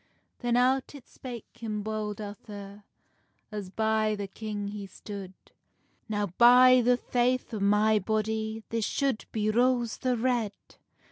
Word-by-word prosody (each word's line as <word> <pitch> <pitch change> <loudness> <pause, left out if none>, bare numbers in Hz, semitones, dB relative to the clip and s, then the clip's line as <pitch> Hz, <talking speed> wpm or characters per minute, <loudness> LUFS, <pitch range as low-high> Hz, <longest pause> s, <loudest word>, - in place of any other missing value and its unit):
Then 240 -1 +1
out 260 +3 +2
it 275 - -12
spake 245 -4 -8
him 220 -3 -4
Bold 215 -1 -3
Arthur, 205 -1 -9 0.7
As 205 -3 -5
by 220 +1 +1
the 205 -1 -4
king 205 0 -5
he 205 -1 -6
stood: 195 -1 -8 0.8
"Now, 205 -1 0
by 250 +1 +8
the 245 +1 +4
faith 250 0 0
o 215 - -2
my 210 +2 +3
body, 220 +2 -2
This 230 -1 -1
shoud 270 0 -1
be 215 -1 0
Rose 240 0 +2
the 255 -2 0
Red!" 235 -3 0
220 Hz, 140 wpm, -28 LUFS, 210-245 Hz, 0.8 s, by